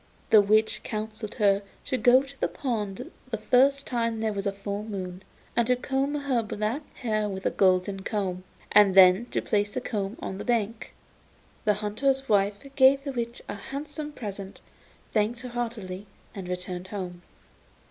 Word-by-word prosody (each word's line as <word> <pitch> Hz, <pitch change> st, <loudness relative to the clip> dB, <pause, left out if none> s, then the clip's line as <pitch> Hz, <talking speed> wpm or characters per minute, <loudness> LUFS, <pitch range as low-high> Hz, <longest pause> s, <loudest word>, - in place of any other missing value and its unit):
The 215 Hz, -, +9 dB
witch 215 Hz, +2 st, +2 dB
counselled 215 Hz, 0 st, -5 dB
her 200 Hz, -3 st, +3 dB, 0.2 s
to -, -, -1 dB
go 255 Hz, +1 st, +5 dB
to 275 Hz, 0 st, -13 dB
the -, -, +2 dB
pond 210 Hz, -7 st, -3 dB, 0.2 s
the 225 Hz, -, -2 dB
first 270 Hz, +6 st, +3 dB
time 230 Hz, -2 st, -1 dB
there 220 Hz, -1 st, 0 dB
was 200 Hz, 0 st, -2 dB
a -, -, +1 dB
full 200 Hz, +1 st, -4 dB
moon, 190 Hz, -4 st, -5 dB, 0.3 s
and 235 Hz, -1 st, +3 dB
to 250 Hz, -, +4 dB
comb 270 Hz, +3 st, -1 dB
her 280 Hz, -4 st, +1 dB
black 215 Hz, +5 st, -2 dB
hair 215 Hz, -3 st, -1 dB
with 190 Hz, -1 st, -6 dB
a -, -, +2 dB
golden 190 Hz, +1 st, +2 dB
comb, 190 Hz, -3 st, -2 dB, 0.3 s
and 200 Hz, -2 st, +6 dB
then 190 Hz, +4 st, +7 dB
to -, -, -2 dB
place 205 Hz, 0 st, +1 dB
the 255 Hz, -, -3 dB
comb 210 Hz, -3 st, -3 dB
on 190 Hz, -, -5 dB
the -, -, -4 dB
bank. 230 Hz, -1 st, -1 dB, 0.7 s
The 210 Hz, -1 st, +4 dB
hunter's 270 Hz, +6 st, 0 dB
wife 200 Hz, -1 st, +3 dB, 0.2 s
gave 275 Hz, 0 st, +6 dB
the 280 Hz, -, -3 dB
witch 235 Hz, -2 st, -4 dB
a -, -, -4 dB
handsome 290 Hz, +8 st, -6 dB
present, 200 Hz, -7 st, -7 dB, 0.5 s
thanked 225 Hz, +2 st, +1 dB
her 250 Hz, -, -6 dB
heartily, 215 Hz, -5 st, -4 dB, 0.3 s
and 190 Hz, -3 st, -7 dB
returned 180 Hz, 0 st, -4 dB
home. 180 Hz, -3 st, -6 dB
215 Hz, 170 wpm, -27 LUFS, 195-245 Hz, 0.7 s, The